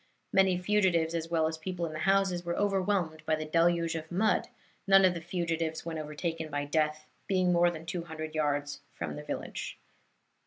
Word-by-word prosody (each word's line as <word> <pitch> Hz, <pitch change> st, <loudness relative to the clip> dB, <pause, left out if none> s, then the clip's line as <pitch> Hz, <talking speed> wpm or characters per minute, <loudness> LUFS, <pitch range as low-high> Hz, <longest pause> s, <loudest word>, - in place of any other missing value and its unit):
Many 190 Hz, -2 st, +4 dB
fugitives, 180 Hz, -4 st, +2 dB
as 165 Hz, -1 st, -2 dB
well 165 Hz, -2 st, +2 dB
as 160 Hz, 0 st, -2 dB
people 175 Hz, +1 st, -3 dB
in 155 Hz, -, -5 dB
the 155 Hz, -, -5 dB
houses, 195 Hz, -2 st, +2 dB
were 170 Hz, 0 st, -2 dB
overwhelmed 190 Hz, -5 st, 0 dB
by 160 Hz, -, +3 dB
the 155 Hz, 0 st, -4 dB
deluge 165 Hz, +1 st, +2 dB
of 160 Hz, 0 st, -6 dB
mud, 205 Hz, +5 st, +2 dB, 0.4 s
none 195 Hz, 0 st, +7 dB
of 185 Hz, -, +4 dB
the 170 Hz, -, -5 dB
fugitives, 165 Hz, -2 st, -2 dB
when 165 Hz, -1 st, -3 dB
overtaken 155 Hz, +1 st, -4 dB
by 145 Hz, -1 st, -2 dB
death, 155 Hz, +1 st, 0 dB, 0.2 s
being 185 Hz, -2 st, +2 dB
more 175 Hz, 0 st, +5 dB
than 165 Hz, -1 st, -7 dB
two 170 Hz, 0 st, -4 dB
hundred 155 Hz, -1 st, -6 dB
yards 145 Hz, -2 st, -1 dB
from 75 Hz, -3 st, -4 dB
the 75 Hz, -, -6 dB
village." -, -, -5 dB
165 Hz, 190 wpm, -30 LUFS, 155-180 Hz, 0.4 s, none